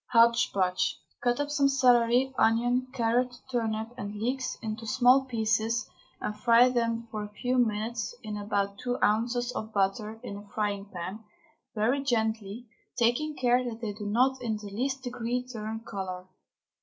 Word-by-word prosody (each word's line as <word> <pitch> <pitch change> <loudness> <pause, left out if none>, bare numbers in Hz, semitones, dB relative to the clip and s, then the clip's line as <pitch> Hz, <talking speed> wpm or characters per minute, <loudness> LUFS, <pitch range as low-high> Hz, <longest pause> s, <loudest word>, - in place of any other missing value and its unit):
HOTCH 235 0 +5
POTCH. 185 -2 0 0.2
Cut 245 +1 +1
up 290 0 -1
some 285 -1 +3
celery, 250 -1 +4
onion, 245 +2 +2
carrot, 245 0 +1 0.2
turnip, 225 -2 -1
and 205 -2 -5
leeks 255 +5 -2
into 220 +1 -4
small 250 +4 +5
pieces 220 -2 0 0.3
and 210 - -3
fry 235 +3 +5
them 230 -1 -1
for 215 -1 -3
a 210 - -7
few 250 +4 0
minutes 220 -1 -1
in 215 -1 -5
about 200 -1 -2
two 245 0 -2
ounces 240 +3 +1
of 220 -2 -5
butter 210 +2 -1
in 200 - -6
a 205 0 -11
frying 205 -2 -1
pan, 190 +2 -7 0.5
very 235 +6 +2
gently, 220 -3 -1 0.3
taking 250 +6 +1
care 250 -1 +3
that 235 -2 -5
they 220 -3 -3
do 210 0 -6
not 255 +5 +2
in 225 -3 -1
the 205 -1 -9
least 260 +5 -2
degree 245 0 -2
turn 220 -2 -5
colour. 185 -4 -5
230 Hz, 160 wpm, -28 LUFS, 210-245 Hz, 0.5 s, HOTCH